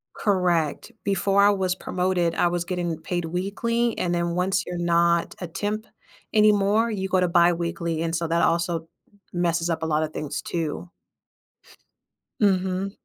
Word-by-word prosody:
Correct. 180 -2 0
Before 200 0 +2
I 205 - +7
was 185 -2 0
promoted, 180 -2 -1
I 175 - +3
was 175 0 -1
getting 175 -3 -2
paid 175 0 -3
weekly, 220 +7 -1
and 175 -1 0
then 170 0 -1
once 185 +2 +1
you're 175 0 -5
not 170 0 +2
a 180 - -5
temp 210 +5 -3 0.5
anymore, 210 +1 +4
you 190 -2 -2
go 185 -1 +2
to 180 - +2
biweekly, 170 -1 +1
and 165 0 -1
so 165 0 -1
that 170 +1 +1
also 170 -1 0 0.4
messes 170 -1 0
up 160 -1 -1
a - - +1
lotta 155 0 +1
things, 150 -2 -4
too. 170 +1 -4 1.5
Mhm. 190 -1 +1
175 Hz, 150 wpm, -24 LUFS, 170-195 Hz, 1.5 s, I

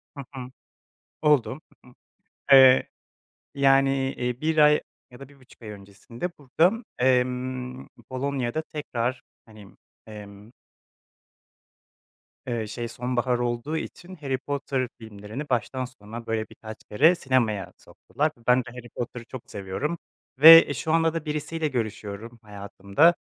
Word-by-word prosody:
Hı 140 - -7
hı. 130 -1 -7 0.7
Oldu. 140 -3 +2 0.2
Hı - - -18
hı. 125 - -19 0.6
Eee, 130 -1 +7 0.7
yani, 135 0 +4 0.2
eee, 125 0 -4
1 160 0 0
ay 150 0 +6 0.3
ya 125 - -15
da 140 - -10
1,5 135 -4 -21
ay 110 - -9
öncesinde 105 - -8
burada, 175 - +1
emm, 125 0 -1 0.2
Polonya'da 135 +1 -2
tekrar, 130 -5 -4 0.2
hani, 110 -3 -14 0.4
emm 105 0 -12 2.0
Eee, 115 -3 -2
şey 120 +2 -5
sonbahar 125 +1 -1
olduğu 120 +6 -2
için 180 +3 -8
Harry 140 -5 -3
Potter 135 -1 -3
filmlerini 110 +6 -8
baştan 130 +1 -1
sona 115 -1 -10
böyle 110 -1 -3
birkaç 110 -1 -11
kere 155 +12 +4
sinemaya 120 - -1
soktular 150 - -3
ve - - -23
ben 125 +1 +5
de 120 - -6
Harry 120 0 -11
Potter'ı 120 0 -6
çok 125 0 -10
seviyorum 100 - -4 0.4
ve, 165 +3 +11
eee, 145 - -3
şu 155 +5 -3
anda 165 0 +2
da 165 -1 -4
birisiyle 155 +1 -2
görüşüyorum 115 -2 -5
hayatımda. 100 - +1
125 Hz, 130 wpm, -25 LUFS, 115-145 Hz, 2.0 s, ve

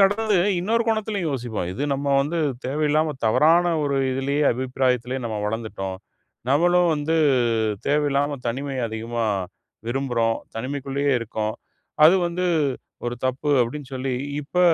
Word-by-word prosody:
கடந்து 205 +2 +3 0.2
இன்னொரு 225 +6 +1
கோணத்துலயும் 215 -6 0
யோசிப்போம். 120 -9 -3
இது 100 - -4
நம்ம 140 +1 -2
வந்து 150 +5 -1 0.3
தேவையில்லாம, 150 +3 +1
தவறான 165 +10 +4
ஒரு 140 -1 0
இதுலயே 135 +3 0
அபிப்பிராயத்திலயே 130 0 -1
நம்ம 110 -2 -3
வளர்ந்துட்டோம். 105 -3 -4 0.5
நம்மளும் 175 +5 +4
வந்து 150 +2 -1 0.7
தேவையில்லாம, 145 0 +1
தனிமைய 135 +2 -2
அதிகமா 115 +1 -3 0.6
விரும்புறோம். 120 -3 0 0.2
தனிமைக்குள்ளயே 140 +2 -1
இருக்கோம். 110 -1 -3 0.5
அது 170 - +6
வந்து 175 +1 -2 0.6
ஒரு 120 - -2
தப்பு. 130 +3 -1
அப்டின்னு 135 +3 -6
சொல்லி, 130 0 -2 0.3
இப்ப 155 +5 -2
140 Hz, 120 wpm, -23 LUFS, 120-155 Hz, 0.7 s, அது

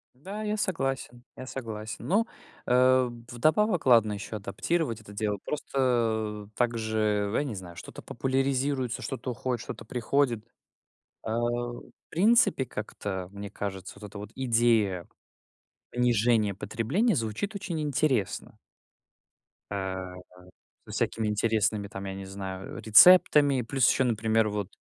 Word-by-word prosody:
Да, 195 +11 -7
я 210 0 -1
согласен, 135 -10 -2
я 130 +1 -8
согласен. 110 -5 -6
Но, 210 +5 +3 0.4
э, 130 0 +5 0.2
вдобавок- 160 - +2
ладно 115 -4 +5
еще 100 +2 -6
адаптировать 115 - -2
это 105 -1 -13
дело. 105 -1 -1
Просто 115 -7 -1
также, 110 -3 0
я - - +2
не 125 -7 -4
знаю, 90 -2 -9
что-то - - -9
популяризируется, 135 -1 -1
что-то 130 -1 -4
уходит, 125 0 -3
что-то 115 - -8
приходит, 120 -1 0 0.8
а, 110 +1 -2
в 120 0 -3 0.2
принципе, 200 - +4
как-то, 100 -5 -5
мне 100 0 -7
кажется, 95 -1 -6
вот 105 - -8
эта 105 +1 -10
вот 105 +1 -8
идея 115 -7 +2 0.8
понижения 115 -3 +2
потребления 115 - 0
звучит 115 - -2
очень 175 -6 -3
интересно. 135 -8 0 1.1
А, 95 -2 -4 0.7
со - - -11
всякими 110 -1 -1
интересными, 105 -1 +1
там, 100 -1 -7
я 95 - -4
не 95 0 -7
знаю, 95 -1 -6
э, - - -6
рецептами. 145 - +7
Плюс 135 +3 +2
еще, - - +3
например, 110 -2 +2
вот 105 -2 -3
115 Hz, 130 wpm, -28 LUFS, 105-135 Hz, 1.1 s, рецептами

